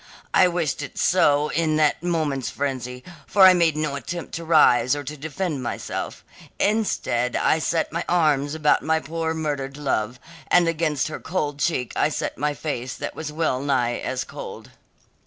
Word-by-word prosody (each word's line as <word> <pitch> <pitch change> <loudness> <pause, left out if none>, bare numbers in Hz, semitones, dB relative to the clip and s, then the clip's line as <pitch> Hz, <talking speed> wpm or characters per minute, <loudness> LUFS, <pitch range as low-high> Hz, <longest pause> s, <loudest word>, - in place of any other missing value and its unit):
I 185 - +6
wished 170 -5 -1
it 145 - -8
so 150 -4 +3
in 160 -1 +1
that 150 -1 +2
moment's 155 -7 -1
frenzy, 125 -3 -4 0.2
for 200 - +4
I 185 - +9
made 165 -4 +2
no 155 -2 -1
attempt 165 +6 -6
to 165 - -4
rise 150 -5 +4
or 145 - -5
to 145 +2 -6
defend 155 0 -3
myself; 120 - -5 0.3
instead 195 - 0
I 160 - +2
set 165 +1 0
my 170 - -1
arms 150 -4 +2
about 155 -2 +3
my 160 0 +1
poor 160 0 -3
murdered 145 -3 -3
love, 125 -4 -1 0.3
and 175 -1 +4
against 155 -4 0
her 155 - -6
cold 150 -5 -3
cheek 135 -6 -1
I - - +2
set - - -3
my 145 +1 -1
face 130 -5 -4
that - - -5
was 155 -2 -6
well 150 -4 0
nigh 125 -4 0
as 130 0 -3
cold. - - -9
150 Hz, 175 wpm, -23 LUFS, 135-165 Hz, 0.3 s, I